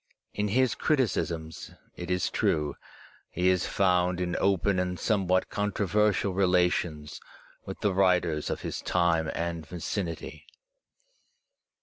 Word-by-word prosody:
In 105 0 -1
his 125 +4 +2
criticisms, 85 - -1 0.3
it 90 -1 -7
is 90 0 0
true, 75 -2 0 0.5
he 90 +1 +1
is 90 -1 +1
found 90 -2 +2
in 90 -1 -2
open 100 0 +2
and 90 -1 -2
somewhat 95 -3 +1
controversial 105 0 +1
relations 90 -5 0 0.5
with - - -7
the 105 -2 +1
writers 90 -5 +2
of - - -3
his - - -4
time 85 -3 +1
and 85 -1 -3
vicinity. 85 +2 -5
90 Hz, 115 wpm, -28 LUFS, 85-100 Hz, 0.5 s, his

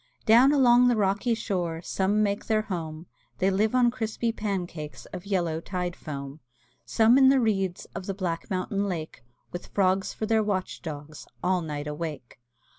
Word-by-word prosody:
Down 240 +5 +7
along 250 -3 +5
the 245 - +3
rocky 210 +3 +1
shore 175 -7 -2
Some 200 +4 +1
make 200 -1 -1
their 215 -1 +2
home, 165 -5 -5 0.3
They 190 +1 +2
live 215 +5 +1
on 245 -1 +4
crispy 230 -1 -2
pancakes 175 - -4
Of 180 +2 -7
yellow 170 -5 0
tide 180 -1 -3
foam; 140 -1 -7 0.5
Some 230 +3 +5
in 265 -1 +7
the 270 0 +5
reeds 195 -6 0
Of 185 - -6
the 195 - -2
black 175 -2 -3
mountain 200 +1 -1
lake, 160 -8 -5 0.3
With 175 - -7
frogs 190 -1 +1
for 220 - -4
their 220 0 +2
watch 200 -3 -2
dogs 150 -2 -8 0.2
All 180 0 +2
night 150 -2 -4
awake. 150 -5 -6
190 Hz, 170 wpm, -27 LUFS, 165-220 Hz, 0.5 s, Down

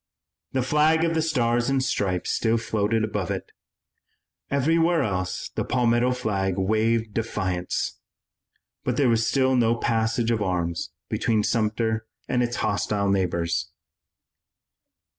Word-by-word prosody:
The 130 -1 +1
flag 155 +4 +3
of 165 0 +1
the 160 - +1
Stars 120 -6 +1
and 135 -1 +1
Stripes 95 -8 -1
still 115 0 +1
floated 110 0 0
above 105 -4 -2
it. - - -4 1.0
Everywhere 165 +4 +2
else 95 -2 -2
the - - -3
Palmetto 120 0 +2
flag 100 -7 -1
waved 110 +3 +1
defiance. 95 -5 -2 0.8
But - - -1
there 135 -4 +3
was 115 -1 +2
still 130 -1 +2
no 115 -2 +3
passage 115 0 0
of 110 -2 0
arms 85 -4 -1 0.2
between 110 -2 +1
Sumter 110 0 0 0.2
and 125 - +1
its 120 0 -1
hostile 100 -1 0
neighbors. 85 -3 0
115 Hz, 125 wpm, -25 LUFS, 100-125 Hz, 1.0 s, flag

